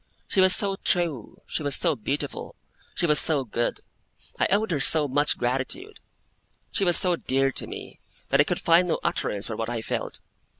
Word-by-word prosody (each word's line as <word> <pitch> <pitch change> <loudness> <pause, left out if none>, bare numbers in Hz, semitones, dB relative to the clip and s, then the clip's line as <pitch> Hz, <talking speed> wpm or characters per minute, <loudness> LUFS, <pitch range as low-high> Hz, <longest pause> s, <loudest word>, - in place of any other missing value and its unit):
She 190 - +1
was 185 0 +6
so 195 -1 +2
true, 165 - -3
she - - -5
was 145 -2 +2
so 165 -4 +1
beautiful, 140 +5 -5 0.4
she - - -1
was 150 -2 +6
so 150 -4 +4
good, 120 +1 -3 0.6
I - - +2
owed 205 +1 0
her 150 - -1
so 150 +1 +5
much 145 +2 +1
gratitude, 130 - -4 0.7
she - - -1
was 175 -2 +5
so 180 -3 +3
dear 135 -3 -1
to - - +1
me, - - -11 0.3
that 140 +1 +3
I - - +1
could 175 - -3
find 170 +2 +2
no 170 - -2
utterance 100 0 -2
for 110 - -4
what 115 +1 -5
I 115 -2 -5
felt. - - -5
150 Hz, 195 wpm, -24 LUFS, 130-175 Hz, 0.7 s, was